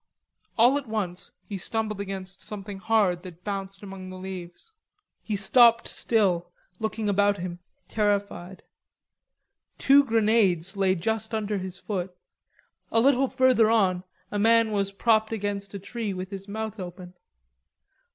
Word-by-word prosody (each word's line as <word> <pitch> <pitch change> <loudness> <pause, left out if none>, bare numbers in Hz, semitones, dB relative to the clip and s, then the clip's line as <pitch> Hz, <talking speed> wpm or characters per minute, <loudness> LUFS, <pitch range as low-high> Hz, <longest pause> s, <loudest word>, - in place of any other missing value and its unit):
All 245 +5 +5
at 275 - -12
once 200 -5 -4 0.2
he 200 -2 -5
stumbled 215 0 -2
against 190 -1 -6
something 200 -1 -7
hard 195 -4 +2
that 180 -1 -12
bounced 195 -1 -5
among 190 -1 -8
the 185 - -8
leaves. 185 - -9 0.5
He 215 - -3
stopped 230 +3 +5
still, 180 -6 +1 0.3
looking 220 0 -2
about 205 0 +3
him, 175 -1 -5 0.3
terrified. 200 -3 -1 1.1
Two 280 +1 +6
grenades 210 -6 +2
lay 190 -1 +2
just 220 +5 -2
under 210 -2 -1
his 185 0 -6
foot, 185 -3 -4 0.7
a 225 - +4
little 270 +2 +4
further 255 -4 +4
on 190 -5 +2 0.3
a 205 - -1
man 225 +1 +4
was 200 -1 0
propped 220 +2 +2
against 205 -2 -3
a - - -2
tree 205 0 -4
with 185 +1 -6
his 195 0 -7
mouth 220 +1 -5
open. 180 0 -8
200 Hz, 140 wpm, -26 LUFS, 185-220 Hz, 1.1 s, Two